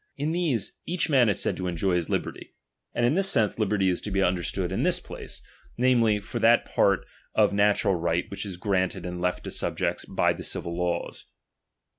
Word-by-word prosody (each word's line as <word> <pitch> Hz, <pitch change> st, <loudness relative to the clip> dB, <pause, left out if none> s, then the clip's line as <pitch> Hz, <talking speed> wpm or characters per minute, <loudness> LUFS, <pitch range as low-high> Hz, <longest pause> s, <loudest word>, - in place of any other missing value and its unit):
In 150 Hz, +2 st, -1 dB
these, 160 Hz, -, -1 dB
each 175 Hz, -2 st, -1 dB
man 125 Hz, -5 st, +5 dB
is 100 Hz, -, +1 dB
said -, -, +1 dB
to 90 Hz, -, -3 dB
enjoy 90 Hz, +2 st, 0 dB
his 85 Hz, -2 st, 0 dB
liberty; -, -, -4 dB, 0.4 s
and 120 Hz, -, +2 dB
in 120 Hz, -, +3 dB
this 195 Hz, +3 st, +2 dB
sense 110 Hz, -, +2 dB
liberty 105 Hz, -2 st, +1 dB
is 90 Hz, -1 st, +1 dB
to -, -, -5 dB
be 95 Hz, -1 st, 0 dB
under 90 Hz, -1 st, +1 dB
stood 90 Hz, +1 st, -2 dB
in 95 Hz, -, -1 dB
this -, -, +2 dB
place, -, -, -9 dB, 0.3 s
namely, 120 Hz, -4 st, +3 dB
for 100 Hz, -, -5 dB
that 115 Hz, +1 st, +5 dB
part 100 Hz, -2 st, +2 dB, 0.3 s
of -, -, +4 dB
natural 100 Hz, -1 st, +3 dB
right 85 Hz, 0 st, 0 dB
which 100 Hz, -, -4 dB
is 95 Hz, -4 st, -6 dB
granted 95 Hz, -2 st, -1 dB
and 90 Hz, 0 st, -5 dB
left 90 Hz, 0 st, -1 dB
to -, -, -6 dB
subjects -, -, -1 dB
by -, -, +1 dB
the -, -, -8 dB
civil 85 Hz, -, -4 dB
laws. 85 Hz, -1 st, -3 dB
100 Hz, 205 wpm, -26 LUFS, 90-115 Hz, 0.4 s, man